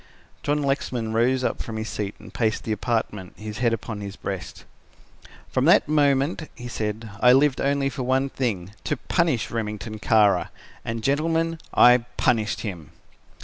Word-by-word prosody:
John 145 0 0
Lexman 125 -5 -1
rose 125 +3 +2
up - - -1
from 110 -1 -5
his 110 0 -3
seat, 105 -1 -4
and - - -14
paced 110 -2 0
the 110 - -3
apartment, 105 -4 -2
his 105 0 -7
head 120 -2 +2
upon 110 -2 -4
his 100 -1 -6
breast. - - -6 0.8
"From - - 0
that - - +5
moment," 145 +1 +2
he 120 - -8
said, 110 -1 -4
"I 125 +1 +7
lived 135 0 +3
only 140 0 +1
for 135 - -4
one 130 +2 +1
thing, 100 -8 -2
to 150 - 0
punish 160 - 0
Remington 110 -1 -4
Kara. 105 -4 +3 0.3
And 115 -1 -4
gentlemen, 165 +4 +1
I 125 0 +7 0.2
punished 110 -2 +1
him." 90 - -6
115 Hz, 160 wpm, -24 LUFS, 110-135 Hz, 0.8 s, I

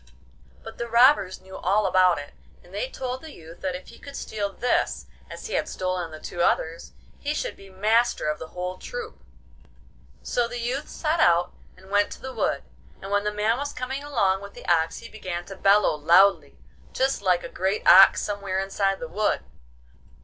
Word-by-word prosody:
But - - -10
the 235 - -3
robbers 235 -5 +4
knew 190 0 -12
all 200 +3 +1
about 185 -1 +4
it, 145 0 -8 0.3
and 175 - -18
they 210 +6 -2
told 255 0 -5
the 315 -2 -10
youth 165 +1 -13
that 185 -1 -2
if 180 - -9
he 235 - -14
could 280 0 -10
steal 205 -2 -3
this 245 +6 0 0.2
as - - -9
he 445 - -5
had - - 0
stolen 185 -2 -2
the 155 -1 -10
two 175 - -5
others, 165 -1 0 0.3
he 295 +1 -2
should - - -3
be 195 - -15
master 215 +1 +1
of 150 0 -1
the 160 - -7
whole 180 +2 -5
troop. 245 - -7 1.0
So 240 -1 0
the 240 +1 -6
youth 250 +5 -3
set 320 +1 -1
out 175 - +3 0.2
and 190 +1 -16
went 205 0 +3
to - - -13
the 260 0 -7
wood, - - -1 0.4
and 195 - -8
when 205 0 +1
the 210 - +1
man 215 +4 0
was 285 0 -4
coming 265 +2 -4
along 200 -10 +1
with 200 0 -10
the - - -11
ox 165 -1 +2
he 230 - -9
began 180 -6 -6
to 195 - -9
bellow 200 +2 +4
loudly, 170 +6 +4 0.4
just 265 -2 0
like 180 -3 +2
a - - -5
great 190 +3 -2
ox 190 +2 +8
somewhere 200 -2 -3
inside 195 0 0
the 245 - -5
wood. 210 - 0
200 Hz, 200 wpm, -25 LUFS, 185-240 Hz, 1.0 s, ox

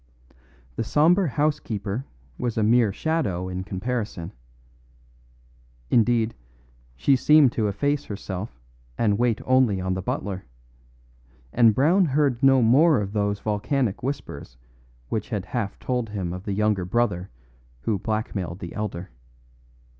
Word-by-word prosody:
The - - 0
sombre 165 - +3
housekeeper 125 -5 -2 0.3
was 120 -2 -2
a 110 - +2
mere 115 -1 +4
shadow 100 - -1
in 95 0 -4
comparison; 100 -3 -4 1.6
indeed, 115 -1 +3 0.6
she 135 - +3
seemed 150 0 +5
to 110 -3 0
efface 145 +9 -1
herself 95 - -6 0.4
and 105 -2 +1
wait 120 -2 +1
only 130 -6 +3
on 95 0 -1
the 95 - -3
butler, 95 +1 -3 1.1
and 115 -3 +5
Brown 175 +8 +4
heard 140 -4 +1
no 135 -2 +5
more 140 +6 +5
of 100 -1 -4
those 100 -1 -1
volcanic 110 +2 -1
whispers 130 - -5 0.5
which 110 -2 -3
had 105 -4 -3
half 110 -6 -3
told 125 -3 -2
him 95 -4 -3
of 90 +1 -8
the 100 - -2
younger 105 -2 +1
brother 95 -2 -1 0.5
who 100 - -1
blackmailed 100 -5 -3
the 85 -3 -8
elder. 95 -6 -5
110 Hz, 130 wpm, -24 LUFS, 95-130 Hz, 1.6 s, seemed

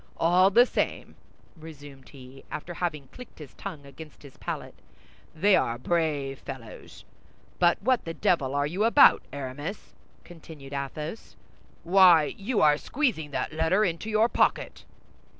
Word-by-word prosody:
All 180 +3 +4
the 240 +5 +5
same," - - -3 0.4
resumed 145 -4 -13
he, 135 -1 -14
after 175 +3 -7
having 155 -6 -4
clicked 250 -1 -13
his 150 -4 -12
tongue 160 -8 -9
against 150 +2 -13
his 140 -2 -14
palate, - - -6 0.6
"they 195 +5 +4
are 115 -7 0
brave 145 -2 -2
fellows! 130 -5 -11 0.5
But 175 -1 +3
what 255 +1 +1
the 165 0 -6
devil 140 -7 0
are 145 0 +1
you 180 +8 -2
about, 235 +5 +6
Aramis?" 145 +7 -7 0.3
continued 155 -5 -13
Athos. 150 +7 -6 0.5
"Why, 175 -4 +5
you 215 +3 -2
are 150 -1 +5
squeezing 240 - -2
that 145 - -4
letter 165 +7 +1
into 175 +4 -3
your 215 +1 +3
pocket!" - - -1
160 Hz, 140 wpm, -26 LUFS, 140-190 Hz, 0.6 s, about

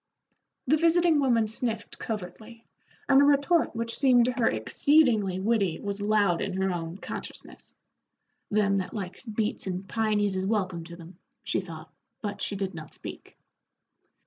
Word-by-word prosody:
The 305 +5 +3
visiting 335 -1 +3
woman 235 -5 +2
sniffed 225 +1 -4
covertly, 220 +2 -7 0.4
and 275 0 +6
a - - +6
retort 285 +2 +3
which 230 0 -2
seemed 250 -3 +5
to 250 - +1
her 245 -2 +1
exceedingly 215 - +2
witty 200 -4 +1
was 200 0 -4
loud 205 -4 +2
in 190 -1 -3
her 190 0 +1
own 165 +1 -5
consciousness. - - -8 0.7
"Them 200 -2 +2
that 185 - -5
likes 190 0 -6
beets 215 -2 -2
and 185 +1 -4
pinies 210 -3 0
is 190 0 -1
welcome 185 -5 -1
to 170 0 -9
them," 170 +1 -13 0.2
she - - 0
thought, 160 -3 -10 0.3
but 205 -2 -5
she 200 - -1
did 195 -1 -3
not 160 -2 -8
speak. - - -10
210 Hz, 155 wpm, -27 LUFS, 190-235 Hz, 0.7 s, and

